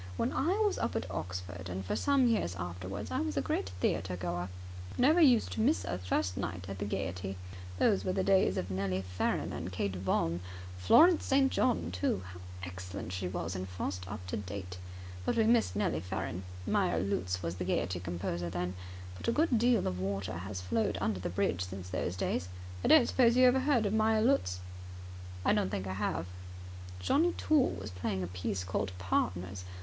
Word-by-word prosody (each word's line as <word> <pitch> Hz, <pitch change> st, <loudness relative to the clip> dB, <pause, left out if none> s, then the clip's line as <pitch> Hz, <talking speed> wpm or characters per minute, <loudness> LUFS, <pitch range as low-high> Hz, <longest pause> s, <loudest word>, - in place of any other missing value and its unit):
When -, -, 0 dB
I 325 Hz, +7 st, +2 dB
was 410 Hz, -, +1 dB
up -, -, -1 dB
at 110 Hz, -, -1 dB
Oxford, 90 Hz, +1 st, -5 dB
and 95 Hz, +1 st, -4 dB
for -, -, -1 dB
some 280 Hz, -2 st, +3 dB
years 220 Hz, -, +1 dB
afterwards, 90 Hz, +3 st, -5 dB
I -, -, 0 dB
was 105 Hz, -1 st, -2 dB
a -, -, +4 dB
great 95 Hz, +1 st, -1 dB
theatre 90 Hz, 0 st, 0 dB
goer. 90 Hz, 0 st, -3 dB, 0.5 s
Never 305 Hz, +7 st, +5 dB
used 250 Hz, -8 st, +5 dB
to -, -, -1 dB
miss 280 Hz, +8 st, +2 dB
a 90 Hz, -, -2 dB
first 90 Hz, 0 st, -1 dB
night 90 Hz, +1 st, -3 dB
at 100 Hz, -1 st, -6 dB
the 100 Hz, -, -2 dB
Gaiety. 95 Hz, -1 st, -3 dB, 0.4 s
Those 200 Hz, -, +3 dB
were 185 Hz, -, 0 dB
the 190 Hz, 0 st, 0 dB
days 190 Hz, -, +3 dB
of 90 Hz, +2 st, -2 dB
Nellie 95 Hz, 0 st, -1 dB
Farren 90 Hz, -1 st, -1 dB
and 90 Hz, +3 st, -4 dB
Kate 95 Hz, +1 st, -2 dB
Vaughan. 85 Hz, -2 st, 0 dB, 0.4 s
Florence 320 Hz, -, +6 dB
St. 270 Hz, 0 st, +3 dB
John, 85 Hz, -1 st, +1 dB
too. 90 Hz, +1 st, 0 dB
How 90 Hz, -, -10 dB, 0.2 s
excellent 90 Hz, 0 st, -6 dB
she 90 Hz, 0 st, -2 dB
was 90 Hz, 0 st, -3 dB
in 95 Hz, 0 st, -3 dB
Faust 90 Hz, 0 st, -4 dB
Up 100 Hz, -2 st, -6 dB
To 90 Hz, -, -3 dB
Date! 95 Hz, -2 st, -6 dB, 0.4 s
But -, -, 0 dB
we 225 Hz, -, +5 dB
missed 225 Hz, -, +3 dB
Nellie 90 Hz, -6 st, +1 dB
Farren. 90 Hz, +1 st, -4 dB, 0.2 s
Meyer 85 Hz, -2 st, +2 dB
Lutz 90 Hz, -1 st, -1 dB
was 85 Hz, +2 st, -3 dB
the 90 Hz, -, -2 dB
Gaiety 90 Hz, 0 st, 0 dB
composer 85 Hz, 0 st, -3 dB
then. 90 Hz, +1 st, -2 dB, 0.4 s
But -, -, -7 dB
a -, -, +4 dB
good 285 Hz, -3 st, +3 dB
deal 240 Hz, -2 st, +3 dB
of 90 Hz, 0 st, -2 dB
water 95 Hz, -1 st, -2 dB
has 95 Hz, 0 st, -5 dB
flowed 110 Hz, +5 st, 0 dB
under 105 Hz, -2 st, 0 dB
the 90 Hz, -, -3 dB
bridge 90 Hz, +1 st, 0 dB
since 90 Hz, -1 st, -7 dB
those 90 Hz, -1 st, -2 dB
days. 90 Hz, -1 st, -1 dB, 0.3 s
I -, -, +2 dB
don't 305 Hz, -6 st, +8 dB
suppose 240 Hz, -2 st, +4 dB
you 255 Hz, -, +7 dB
have 250 Hz, -, +7 dB
ever 265 Hz, 0 st, +1 dB
heard 260 Hz, -7 st, +3 dB
of 205 Hz, -, 0 dB
Meyer 220 Hz, 0 st, +3 dB
Lutz?" 90 Hz, -, +2 dB, 0.8 s
"I -, -, +5 dB
don't -, -, +1 dB
think 95 Hz, 0 st, -3 dB
I 95 Hz, -, -3 dB
have." 95 Hz, -4 st, -1 dB, 0.7 s
"Johnnie 320 Hz, -, +3 dB
Toole 300 Hz, -4 st, +2 dB
was 95 Hz, +1 st, -6 dB
playing 90 Hz, +1 st, -2 dB
a -, -, -3 dB
piece 90 Hz, +1 st, -2 dB
called 95 Hz, +1 st, -2 dB
Partners. 90 Hz, 0 st, -1 dB
95 Hz, 200 wpm, -32 LUFS, -, 0.8 s, don't